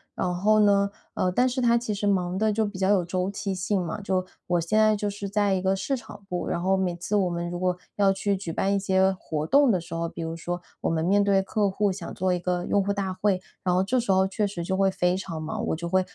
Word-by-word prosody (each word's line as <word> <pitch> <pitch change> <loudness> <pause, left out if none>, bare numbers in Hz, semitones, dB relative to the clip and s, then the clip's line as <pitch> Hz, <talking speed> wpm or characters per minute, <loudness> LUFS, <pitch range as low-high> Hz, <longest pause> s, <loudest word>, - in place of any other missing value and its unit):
然 180 -1 -1
后 215 +4 +3
呢， 200 -1 +4 0.2
呃， 180 - 0
但 250 +7 +3
是 255 0 -1
它 235 0 +4
其 230 -2 -2
实 205 0 -3
忙 185 -2 +1
的 215 +2 +2
就 220 +1 +1
比 205 -2 -6
较 190 +1 +1
有 190 -4 +3
周 185 +2 -1
期 195 -1 -3
性 185 +1 0
嘛。 205 +5 -4
就 190 -2 -1 0.2
我 175 -1 +2
现 170 +6 0
在 215 0 +5
就 205 0 -1
是 200 -1 -5
在 205 -1 +2
一 185 - 0
个 190 +1 +1
市 270 +8 -1
场 210 -4 -11
部， 180 -2 -3
然 170 - -1
后 190 +2 +2
每 190 -2 0
次 185 +4 -2
我 190 -3 +2
们 170 0 -3
如 175 - -4
果 180 0 0 0.2
要 200 -1 +4
去 200 +1 0
举 185 -3 -5
办 195 +4 0
一 - - +2
些 190 -1 +2
活 155 -3 -4
动 280 - +5
的 185 - +2
时 165 0 -9
候 165 0 -2
比 170 - -8
如 165 0 -4
说 175 +1 -4 0.2
我 - - 0
们 160 0 0
面 200 +3 +4
对 200 -1 +3
客 200 +1 0
户， 205 +2 +1
想 185 - -5
做 185 0 0
一 180 - -1
个 180 0 -1
用 200 - +2
户 200 - -1
大 195 -2 -2
会， 190 -1 0 0.2
然 180 - +1
后 180 - +3
这 195 +7 0
时 235 -5 +1
候 190 0 +4
确 205 +2 -1
实 195 -4 -4
就 190 +3 -1
会 195 0 +3
非 180 -1 +1
常 170 -4 -5
忙。 155 - -3
我 - - 0
就 170 +2 -4
会 185 +2 +3
190 Hz, 305 characters per minute, -26 LUFS, 180-205 Hz, 0.2 s, 在